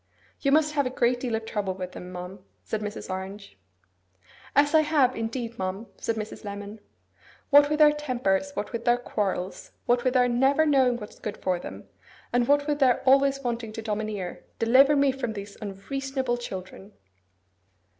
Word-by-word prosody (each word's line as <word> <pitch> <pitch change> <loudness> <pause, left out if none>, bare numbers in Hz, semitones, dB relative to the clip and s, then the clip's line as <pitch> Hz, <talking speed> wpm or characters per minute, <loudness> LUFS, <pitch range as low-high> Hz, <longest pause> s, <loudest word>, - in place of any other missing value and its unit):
'You 275 - +1
must 305 +1 +3
have 285 -3 +1
a - - -2
great 245 -1 +1
deal 245 -3 -2
of 225 0 -4
trouble 205 -4 -2
with 185 -1 -6
them, 180 0 -9
ma'am,' 180 +2 -7 0.2
said 220 - -3
Mrs. 210 0 -5
Orange. 195 +2 -6 1.0
'Ah, 285 +1 +6
I - - +8
have, 295 -5 +2
indeed, 230 +1 -4
ma'am!' 190 +4 -3
said 230 - -2
Mrs. 215 -1 -6
Lemon. 205 +1 -7 0.7
'What 290 0 +7
with 300 - +1
their 300 -1 +7
tempers, 255 -5 -1
what - - -3
with 235 0 -4
their 240 0 +4
quarrels, 195 -6 -3
what 245 0 +2
with 255 0 +1
their 250 -1 +5
never 270 +5 +3
knowing 265 -5 +3
what's 210 -3 -10
good 210 -1 -5
for 180 -2 -1
them, - - -9 0.5
and 245 0 +2
what 285 0 +3
with 295 -1 -1
their 255 -4 +3
always 275 +1 +4
wanting 235 -3 -3
to 225 - -5
domineer, 210 -4 -4
deliver 265 +6 +5
me 280 -1 +4
from 260 -4 -4
these 200 -1 -8
unreasonable 260 +5 -3
children! 190 -2 -8
240 Hz, 175 wpm, -26 LUFS, 205-270 Hz, 1.0 s, I